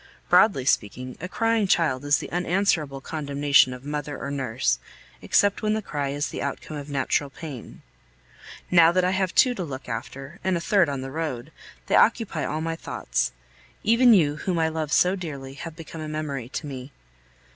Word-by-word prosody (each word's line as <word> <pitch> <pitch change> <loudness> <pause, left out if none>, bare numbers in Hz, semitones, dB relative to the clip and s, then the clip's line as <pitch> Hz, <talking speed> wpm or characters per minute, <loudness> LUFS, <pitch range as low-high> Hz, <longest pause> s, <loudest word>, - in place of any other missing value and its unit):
Broadly 195 - +5
speaking, 125 +2 0
a 180 - -5
crying 225 -1 +1
child 155 -8 +2
is 145 -1 +4
the - - -7
unanswerable 175 -6 0
condemnation 140 -2 +2
of 125 +1 -9
mother 145 -1 -4
or 140 - -5
nurse, 110 - 0 0.4
except 205 -1 +2
when 215 -1 +1
the 220 - -1
cry 145 -5 -3
is 145 +1 -2
the - - -5
outcome 140 +2 -4
of 145 0 -7
natural 140 +1 0
pain. 135 -4 -9 0.9
Now 170 -2 +7
that 185 0 +2
I 180 - +2
have 190 -1 -1
two 255 - +5
to 190 - -4
look 135 -4 -7
after 135 +5 -6
(and 185 -2 +1
a - - -2
third 170 -1 +3
on 140 -2 -3
the 135 0 -6
road), 150 -3 -4 0.3
they - - +1
occupy 220 -9 +3
all 155 +1 -2
my 165 0 -2
thoughts. 60 - -2 0.5
Even 230 +3 +5
you, 150 -5 +2
whom 180 +2 -2
I 160 -1 +2
love 160 -2 -3
so 180 +4 +4
dearly, 140 -7 -7
have 160 +3 -8
become 165 0 -9
a 155 - -5
memory 145 -5 -4
to 150 - -5
me. 135 -1 -7
150 Hz, 190 wpm, -25 LUFS, 135-180 Hz, 0.9 s, Now